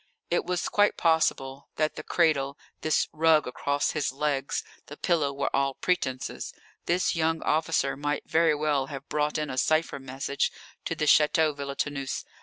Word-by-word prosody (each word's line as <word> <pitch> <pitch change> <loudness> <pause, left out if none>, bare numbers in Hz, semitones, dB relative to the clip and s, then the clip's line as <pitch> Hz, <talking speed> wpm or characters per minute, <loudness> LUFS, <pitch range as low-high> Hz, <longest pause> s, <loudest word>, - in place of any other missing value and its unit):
_] - - -36 0.3
It 175 - +1
was 180 0 -1
quite 205 0 +2
possible 140 -5 +1
that 155 0 0
the - - -5
cradle, 150 -4 +1 0.2
this 155 - +2
rug 160 -1 +4
across 140 +3 -1
his 150 -5 -1
legs, 140 0 -1 0.2
the 145 - -10
pillow, 155 -5 +1
were 140 0 -2
all 135 -1 +1
pretences. 130 -8 -2 0.3
This 175 +1 +1
young 160 0 0
officer 160 +1 +1
might 145 +2 -2
very 160 -1 +3
well 145 -3 0
have 135 0 -8
brought 150 0 0
in 150 -2 -2
a 130 - -1
cipher 155 -2 +1
message 135 +1 -2 0.3
to 165 - -2
the 155 - -1
Château 150 0 +4
Villetaneuse. 140 -1 -3
150 Hz, 165 wpm, -27 LUFS, 140-160 Hz, 0.3 s, rug